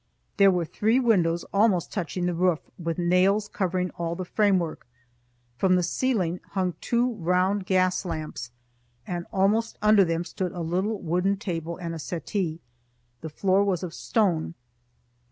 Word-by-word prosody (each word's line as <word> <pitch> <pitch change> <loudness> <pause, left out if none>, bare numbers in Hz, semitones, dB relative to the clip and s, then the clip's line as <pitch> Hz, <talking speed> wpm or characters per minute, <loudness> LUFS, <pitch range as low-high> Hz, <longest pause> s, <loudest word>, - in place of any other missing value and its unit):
There 200 -1 +7
were 180 -3 +1
three 215 +9 +1
windows 175 -9 +2
almost 200 -4 +2
touching 180 -2 -2
the 180 - 0
roof, 175 -1 +2 0.2
with 165 -1 -3
nails 185 +4 +3
covering 185 -2 -1
all 170 0 -3
the 185 - -5
framework. 185 - 0 0.7
From 185 -1 +4
the 180 - +2
ceiling 180 -3 0
hung 185 -2 0
two 240 +1 +1
round 185 +1 0
gas 185 -1 +2
lamps, 155 -8 -5 0.6
and 175 -1 -4
almost 210 +4 +1
under 210 -1 +5
them 165 -1 -1
stood 180 0 -4
a 175 - -5
little 190 +6 -1
wooden 180 +4 0
table 170 -5 -4
and 170 -1 -5
a 165 - -6
settee. 170 +1 -3 0.6
The 160 - -5
floor 190 +5 +2
was 190 -3 0
of 175 -2 -5
stone. 170 -7 0
180 Hz, 155 wpm, -26 LUFS, 170-200 Hz, 0.7 s, There